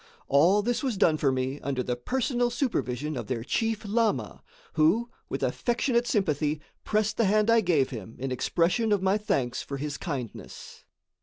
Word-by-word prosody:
All 175 Hz, +9 st, +4 dB
this 245 Hz, +2 st, 0 dB
was 255 Hz, -7 st, -1 dB
done 165 Hz, -6 st, +4 dB
for 140 Hz, -3 st, +2 dB
me 130 Hz, +2 st, -2 dB
under 135 Hz, -2 st, -2 dB
the 125 Hz, -, -1 dB
personal 245 Hz, -, 0 dB
supervision 155 Hz, -, -2 dB
of 120 Hz, -4 st, -5 dB
their 120 Hz, -3 st, -2 dB
chief 225 Hz, -, -1 dB
lama, 220 Hz, +1 st, 0 dB, 0.3 s
who, 190 Hz, +10 st, +2 dB, 0.2 s
with -, -, -3 dB
affectionate 240 Hz, 0 st, 0 dB
sympathy, 155 Hz, -, 0 dB, 0.2 s
pressed 215 Hz, 0 st, 0 dB
the 230 Hz, -, +3 dB
hand 215 Hz, +3 st, +3 dB
I 230 Hz, 0 st, +5 dB
gave 160 Hz, -9 st, +2 dB
him 110 Hz, -2 st, -8 dB
in 135 Hz, +1 st, -4 dB
expression 175 Hz, -, +1 dB
of 200 Hz, -2 st, +2 dB
my 195 Hz, +2 st, +2 dB
thanks 130 Hz, -12 st, -1 dB
for 140 Hz, -, -5 dB
his 145 Hz, +1 st, -4 dB
kindness. 135 Hz, -, -7 dB
180 Hz, 170 wpm, -27 LUFS, 135-225 Hz, 0.3 s, I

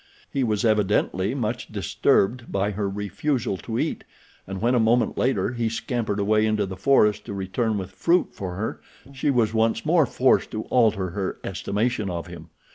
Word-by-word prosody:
He 135 Hz, -, 0 dB
was 110 Hz, -2 st, 0 dB
evidently 105 Hz, 0 st, +1 dB
much 120 Hz, -1 st, -2 dB
disturbed 105 Hz, +4 st, +1 dB
by 100 Hz, +1 st, 0 dB
her 100 Hz, 0 st, -2 dB
refusal 105 Hz, +4 st, -2 dB
to 115 Hz, +4 st, -5 dB
eat, -, -, -2 dB, 0.4 s
and 95 Hz, 0 st, -5 dB
when, 120 Hz, +4 st, +2 dB
a 125 Hz, -, +3 dB
moment 115 Hz, +2 st, +2 dB
later, 130 Hz, -1 st, 0 dB
he 115 Hz, -2 st, -1 dB
scampered 115 Hz, -2 st, -2 dB
away 105 Hz, +2 st, +2 dB
into 105 Hz, -1 st, +1 dB
the 95 Hz, 0 st, -6 dB
forest 105 Hz, -1 st, +3 dB
to 100 Hz, -, -6 dB
return 105 Hz, +3 st, -1 dB
with 95 Hz, -1 st, -5 dB
fruit 170 Hz, -, +2 dB
for 90 Hz, -2 st, -5 dB
her 105 Hz, +4 st, -4 dB, 0.3 s
she 135 Hz, +2 st, -1 dB
was 115 Hz, -5 st, +2 dB
once 115 Hz, 0 st, +1 dB
more 160 Hz, -3 st, +4 dB
forced 125 Hz, +2 st, +2 dB
to 110 Hz, 0 st, -3 dB
alter 105 Hz, -7 st, +2 dB
her 95 Hz, +1 st, -3 dB
estimation 105 Hz, +3 st, -1 dB
of 85 Hz, -2 st, -4 dB
him. 85 Hz, -2 st, -11 dB
110 Hz, 180 wpm, -24 LUFS, 100-120 Hz, 0.4 s, more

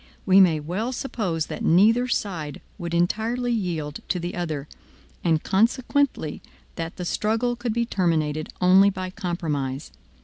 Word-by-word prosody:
We 190 Hz, 0 st, +6 dB
may 170 Hz, -5 st, +5 dB
well 185 Hz, +11 st, -3 dB
suppose 200 Hz, -, -2 dB
that -, -, -6 dB
neither 225 Hz, +8 st, +4 dB
side 165 Hz, -, -3 dB, 0.2 s
would 170 Hz, -1 st, -4 dB
entirely 225 Hz, +8 st, 0 dB
yield 165 Hz, -9 st, -2 dB
to 180 Hz, -, 0 dB
the 175 Hz, +1 st, -4 dB
other, 155 Hz, -5 st, -3 dB, 0.6 s
and 160 Hz, -3 st, +2 dB
consequently 235 Hz, -, +1 dB, 0.3 s
that 165 Hz, 0 st, -5 dB
the 180 Hz, -, -5 dB
struggle 225 Hz, +6 st, 0 dB
could 240 Hz, -1 st, -3 dB
be 235 Hz, +1 st, 0 dB
terminated 155 Hz, -7 st, 0 dB
only 190 Hz, +2 st, +6 dB
by 185 Hz, -1 st, -5 dB
compromise. 155 Hz, -8 st, -3 dB
180 Hz, 140 wpm, -24 LUFS, 160-225 Hz, 0.6 s, We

